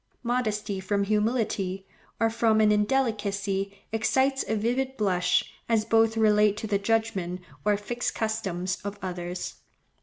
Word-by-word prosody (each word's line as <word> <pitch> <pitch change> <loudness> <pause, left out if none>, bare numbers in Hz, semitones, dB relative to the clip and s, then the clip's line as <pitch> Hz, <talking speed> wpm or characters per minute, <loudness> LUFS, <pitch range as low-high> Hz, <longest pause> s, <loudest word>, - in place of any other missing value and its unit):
Modesty 215 -5 -1
from 200 +1 0
humility, 210 -3 0 0.3
or 225 0 +2
from 225 -1 +3
an 215 -1 +5
indelicacy, 205 -4 0 0.2
excites 265 +5 +2
a 220 - 0
vivid 255 +5 -1
blush, 185 -4 +1 0.2
as 220 -2 +2
both 225 0 +3
relate 210 -1 +4
to 220 - -4
the 200 -2 +1
judgment 200 -4 0 0.2
or 210 -1 +3
fixed 240 +4 -3
customs 190 -5 -2
of 205 0 -5
others. 180 -1 -4
210 Hz, 130 wpm, -27 LUFS, 195-225 Hz, 0.3 s, an